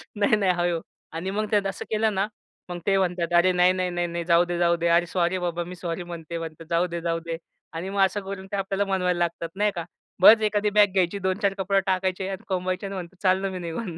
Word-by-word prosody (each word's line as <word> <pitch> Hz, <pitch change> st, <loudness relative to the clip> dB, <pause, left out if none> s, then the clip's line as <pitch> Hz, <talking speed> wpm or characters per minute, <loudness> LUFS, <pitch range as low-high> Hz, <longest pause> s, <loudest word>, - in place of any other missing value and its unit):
नाही, 205 Hz, +1 st, +3 dB
नाही 200 Hz, -3 st, +2 dB
हळू. 175 Hz, -1 st, 0 dB, 0.3 s
आणि 170 Hz, +4 st, -3 dB
मग 215 Hz, +2 st, -1 dB
त्यात 205 Hz, -2 st, +2 dB
असं 195 Hz, -, -5 dB
केलं 220 Hz, 0 st, +1 dB
ना, 195 Hz, +2 st, +1 dB, 0.4 s
मग 175 Hz, 0 st, -5 dB
ते 195 Hz, -1 st, +4 dB
म्हणतात, 175 Hz, -2 st, -1 dB
"अरे 180 Hz, +2 st, +5 dB
नाही, 180 Hz, 0 st, +4 dB
नाही 185 Hz, -1 st, -1 dB
नाही, 175 Hz, 0 st, -1 dB
नाही, 170 Hz, 0 st, -4 dB
जाऊदे 175 Hz, +1 st, +3 dB
जाऊदे, 170 Hz, -1 st, +2 dB
अरे 170 Hz, +1 st, +4 dB
सॉरी 175 Hz, +1 st, 0 dB
बाबा, 175 Hz, -1 st, -2 dB
मी 180 Hz, +2 st, -8 dB
सॉरी 170 Hz, 0 st, -4 dB
म्हणते." 170 Hz, -1 st, -7 dB
म्हणतात 165 Hz, -1 st, -7 dB
"जाऊदे 170 Hz, 0 st, 0 dB
जाऊदे." 165 Hz, 0 st, -2 dB, 0.4 s
आणि 170 Hz, +4 st, -4 dB
मग 200 Hz, 0 st, 0 dB
असं 200 Hz, +2 st, -2 dB
करून 195 Hz, -1 st, -6 dB
ते -, -, -1 dB
आपल्याला 195 Hz, +1 st, -1 dB
मनवायला 180 Hz, -2 st, +1 dB
लागतात, 170 Hz, -1 st, -1 dB
नाही 210 Hz, +1 st, +2 dB
का. 170 Hz, -2 st, -4 dB, 0.4 s
बस 220 Hz, +4 st, +9 dB
एखादी 210 Hz, 0 st, +1 dB
बॅग 205 Hz, -1 st, +4 dB
घ्यायची, 190 Hz, +1 st, +1 dB
2-4 195 Hz, +1 st, 0 dB
कपडे 195 Hz, +1 st, +2 dB
टाकायचे 185 Hz, 0 st, 0 dB
आणि 190 Hz, -1 st, -6 dB
कोंबायचे 185 Hz, 0 st, -2 dB
आणि 195 Hz, -, -6 dB
म्हणायचं 180 Hz, 0 st, -8 dB
"चाललो 190 Hz, +1 st, +2 dB
मी 185 Hz, -, -5 dB
निघून." 170 Hz, +1 st, -5 dB
180 Hz, 225 wpm, -25 LUFS, 170-195 Hz, 0.4 s, बस